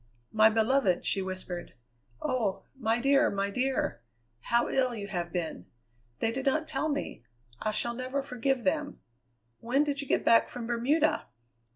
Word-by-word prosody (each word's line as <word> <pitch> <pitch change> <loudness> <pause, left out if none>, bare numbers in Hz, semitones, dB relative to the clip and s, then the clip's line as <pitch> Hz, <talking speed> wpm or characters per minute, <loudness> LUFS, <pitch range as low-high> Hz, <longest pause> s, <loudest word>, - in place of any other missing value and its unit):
"My 220 0 +6
beloved!" 220 -3 +2
she 195 - +2
whispered. 185 -2 -6 0.5
"Oh! 215 -7 -1
my 230 -2 0
dear, 275 +2 +4
my 200 0 -1
dear! 250 - -1 0.4
How 235 - +1
ill 255 -2 +1
you 205 -2 -5
have 175 -3 -3
been! 165 - -4 0.5
They 225 - 0
did 265 +3 -3
not 310 +3 +1
tell 310 0 -1
me. 290 - -3 0.4
I 215 - 0
shall 225 +3 +1
never 255 +3 -3
forgive 255 -1 -1
them. 295 +1 -1 0.6
When 260 +5 +2
did 285 -1 -1
you 280 - -7
get - - +1
back 230 - +5
from 245 -2 -6
Bermuda?" 265 +7 +1
240 Hz, 160 wpm, -29 LUFS, 210-275 Hz, 0.6 s, My